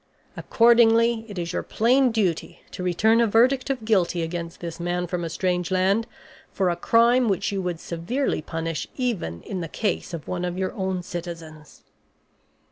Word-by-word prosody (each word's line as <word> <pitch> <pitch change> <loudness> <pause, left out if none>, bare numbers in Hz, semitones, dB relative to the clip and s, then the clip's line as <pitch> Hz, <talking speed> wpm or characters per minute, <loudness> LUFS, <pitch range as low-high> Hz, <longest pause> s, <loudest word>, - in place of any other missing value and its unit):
Accordingly, 230 -1 +4
it 200 - -8
is 170 -1 -3
your - - -1
plain 250 +3 +2
duty 195 -8 -1
to - - -7
return 215 +6 +3
a 230 - +3
verdict 255 +5 +3
of 255 -5 -2
guilty 180 -5 +1
against 170 0 -5
this 170 -1 -7
man 175 +1 -1
from 175 0 -3
a 165 - -3
strange 180 0 -1
land 195 +4 +1 0.4
for 185 -2 +1
a - - -1
crime 235 +6 +3
which 195 +1 0
you 195 -1 -2
would 175 -3 -3
severely 175 - -2
punish 165 +1 -4
even 205 - -2
in 185 -2 -5
the 165 - -4
case 210 -2 -2
of 165 -3 -7
one 180 -1 -3
of 180 0 -3
your 190 0 -2
own 190 -2 -2
citizens." 165 -3 -8
185 Hz, 175 wpm, -24 LUFS, 170-225 Hz, 0.4 s, Accordingly